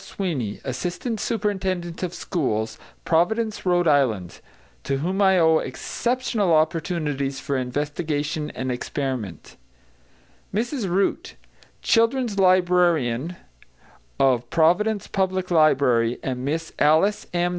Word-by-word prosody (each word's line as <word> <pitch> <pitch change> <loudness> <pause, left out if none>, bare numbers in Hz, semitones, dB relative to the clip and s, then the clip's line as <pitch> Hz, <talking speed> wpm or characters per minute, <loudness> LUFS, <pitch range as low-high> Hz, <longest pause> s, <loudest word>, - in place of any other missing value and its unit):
Sweeney, 140 - -3
assistant 180 - -3
superintendent 190 -6 -2
of 180 -1 -3
schools, 115 -12 -2 0.3
Providence, 215 +7 +1
R.I., 145 - +3 0.6
to 135 - -1
whom 185 +8 -1
I 190 -1 +5
owe 160 -2 +4
exceptional 235 - -1
opportunities 155 -4 -1
for 140 - -3
investigation 145 +3 -2
and 130 0 -3
experiment; 125 - -4 0.9
Mrs 230 0 -2
Root, 190 +3 -1 0.5
children's 230 -2 +2
librarian 175 -6 +2 0.8
of 130 -3 +2
Providence 190 +6 +2
Public 185 -1 -1
Library, 130 -7 +3
and 125 -1 -3
Miss 160 +4 -3
Alice 160 +8 +3
M. 175 0 +1
165 Hz, 100 wpm, -23 LUFS, 135-190 Hz, 0.9 s, I